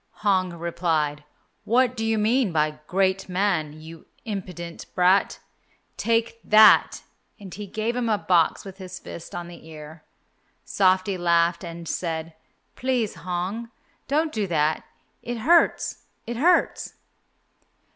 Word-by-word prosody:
Hong 185 -3 +2
replied, 160 -3 -1 0.4
"What 250 +2 +2
do 225 - -3
you 225 0 +1
mean 220 0 +2
by 150 -1 0
'great 190 0 0
man,' 180 -5 0
you 160 +1 -12 0.2
impudent 180 -5 -6
brat? 185 +2 +3 0.6
Take 230 0 0
that," 215 +1 +6 0.4
and 195 -3 -10
he 210 0 -7
gave 220 +4 -2
him 245 -2 -1
a 215 - +2
box 175 -4 +2
with 195 0 -10
his 185 -1 -8
fist 170 - -10
on 175 -1 -5
the 175 -2 -13
ear. 155 0 -11 0.6
Softy 185 0 +2
laughed, 170 +1 +2
and 170 -1 -8
said, 165 -1 -3 0.4
"Please, 250 -5 -1
Hong, 185 +6 -4 0.4
don't 310 +3 +1
do 215 -6 -2
that, 155 -2 0 0.4
it 240 0 -5
hurts! 330 +10 +2 0.2
it 235 0 -5
hurts!" 340 +7 +2
185 Hz, 130 wpm, -24 LUFS, 170-225 Hz, 0.6 s, that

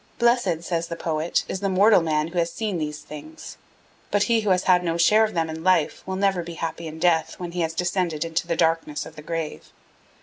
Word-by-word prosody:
Blessed, 235 -9 +2
says 170 -1 -2
the 170 - -5
poet, 160 0 -1
is 190 - -3
the 200 0 -1
mortal 200 +1 +5
man 155 -1 0
who 175 +1 -2
has 170 0 0
seen 205 -1 -3
these 150 -1 -4
things, 230 - -10 0.5
but 205 0 +2
he 230 -2 +2
who 210 - -1
has 185 -1 +3
had 180 -1 +4
no 165 -1 -1
share 210 +6 +5
of 220 -2 -1
them 165 -1 +1
in 160 0 -6
life 185 -4 +2
will 190 - -2
never 195 -2 +1
be 170 0 -8
happy 165 0 -4
in 155 0 -8
death 165 -1 +1
when 175 -1 -5
he 175 0 -2
has 165 0 -1
descended 175 -3 -1
into 165 +1 -2
the 170 - 0
darkness 160 -2 0
of - - -12
the 150 - -9
grave. 165 0 -5
170 Hz, 235 wpm, -24 LUFS, 160-185 Hz, 0.5 s, mortal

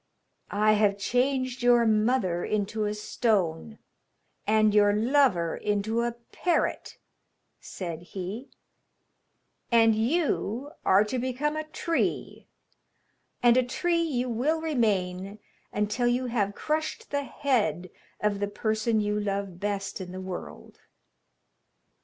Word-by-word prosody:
'I 210 +1 +3
have 205 -2 +3
changed 255 +3 0
your 240 -1 +5
mother 215 -5 +2
into 215 +1 -1
a 210 0 -2
stone, 210 -2 -1 0.7
and 215 0 +4
your 205 -1 +5
lover 225 - +2
into 210 +3 -1
a 235 0 -1 0.2
parrot,' 355 -2 -1 0.6
said 170 -4 -6
he, 195 +8 -7 1.2
'and 225 -1 +5
you 260 - 0
are 195 +2 +5
to 230 +4 -3
become 260 +4 -1
a 310 0 -3
tree, 330 +2 -2 1.0
and 240 0 +6
a 255 - +4
tree 335 +7 0
you 260 -7 -1
will 260 +8 0
remain 200 - -1 0.3
until 210 +4 0
you 245 +1 +1
have 205 -5 -1
crushed 310 +1 -3
the 285 0 0
head 210 - -1 0.3
of 210 -1 0
the 205 - 0
person 220 +1 0
you 210 0 0
love 200 -3 -3
best 200 -1 -3
in 180 -1 -7
the 185 - -6
world. 185 -1 -8
220 Hz, 120 wpm, -27 LUFS, 200-255 Hz, 1.2 s, and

